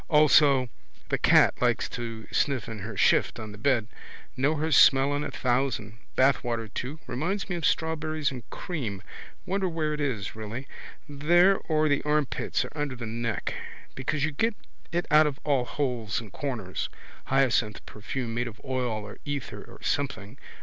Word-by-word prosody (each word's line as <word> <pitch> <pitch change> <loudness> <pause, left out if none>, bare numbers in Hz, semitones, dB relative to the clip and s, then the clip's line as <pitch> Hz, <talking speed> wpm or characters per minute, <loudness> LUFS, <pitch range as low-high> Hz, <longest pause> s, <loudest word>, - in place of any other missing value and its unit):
Also 150 -4 +6 0.4
the - - +1
cat - - +6
likes - - +2
to 115 -2 -6
sniff 140 -4 +1
in 110 -2 -6
her 105 +1 -6
shift - - +3
on 110 -1 -6
the 105 - -10
bed. 125 -3 +2 0.5
Know 140 +4 +2
her 155 +2 -1
smell 135 0 +6
in 145 +1 -1
a - - -3
thousand. 120 -4 -1 0.2
Bathwater 120 -4 +2
too. 135 +5 -4
Reminds 185 +11 -2
me - - 0
of 170 -3 +1
strawberries 155 -2 0
and 130 -2 -6
cream. 120 - -4 0.4
Wonder 190 0 0
where 155 -2 -1
it 150 - -3
is 115 -10 -2
really. 110 +5 -6 0.4
There 175 +7 +4
or 155 -4 +1
the 145 -1 +2
armpits 150 -2 0
or - - -9
under 145 -3 -2
the 120 -1 -6
neck. 115 0 -2 0.4
Because 135 +3 -1
you 155 - -2
get 225 +10 0 0.4
it 175 +1 0
out 155 0 +7
of 140 -2 -4
all 140 -4 +2
holes 120 -5 -2
and 110 -4 -10
corners. 120 -9 -3 0.4
Hyacinth 125 -5 +1
perfume 115 +2 -5
made 120 +1 -1
of 115 -1 -9
oil 125 -5 -2
of 100 - -11
ether 145 -2 -4
or - - -14
something. 125 -3 -2
135 Hz, 170 wpm, -27 LUFS, 115-150 Hz, 0.5 s, out